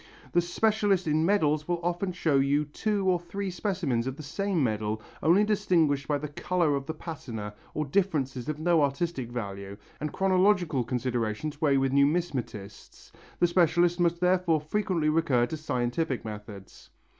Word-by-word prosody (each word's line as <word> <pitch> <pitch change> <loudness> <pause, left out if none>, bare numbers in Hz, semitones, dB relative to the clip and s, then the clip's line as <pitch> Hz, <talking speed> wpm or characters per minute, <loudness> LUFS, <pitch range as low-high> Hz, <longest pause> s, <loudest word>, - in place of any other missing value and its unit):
The 175 - +3
specialist 205 +1 +1
in 155 +1 +2
medals 155 -7 +2
will 175 -1 0
often 175 +2 -1
show 165 -5 +1
you 140 +2 +2
two 200 +6 -1
or 180 -2 +3
three 190 +3 -5
specimens 170 - -1
of 130 - -3
the 155 - -9
same 195 +1 -1
medal 110 -2 -1 0.2
only 175 +6 +5
distinguished 165 -9 +1
by 145 - +1
the 150 +1 -5
colour 160 +1 0
of 140 0 -4
the 160 - -2
patina 115 -11 -6 0.2
or 155 - -1
differences 140 -6 -1
of 155 - -2
no 165 0 +3
artistic 140 -3 -1
value, 100 -4 -6 0.2
and 150 0 -3
chronological 185 -7 +2
considerations 125 +3 -2
weigh 140 -3 +3
with 135 0 +1
numismatists. 140 - -1 0.3
The - - +5
specialist 175 0 +3
must 170 -1 +2
therefore 180 -3 +2
frequently 170 0 -1
recur 155 -6 +2
to 160 - -5
scientific 130 -2 -2
methods. 105 -2 -9
155 Hz, 155 wpm, -28 LUFS, 130-175 Hz, 0.3 s, only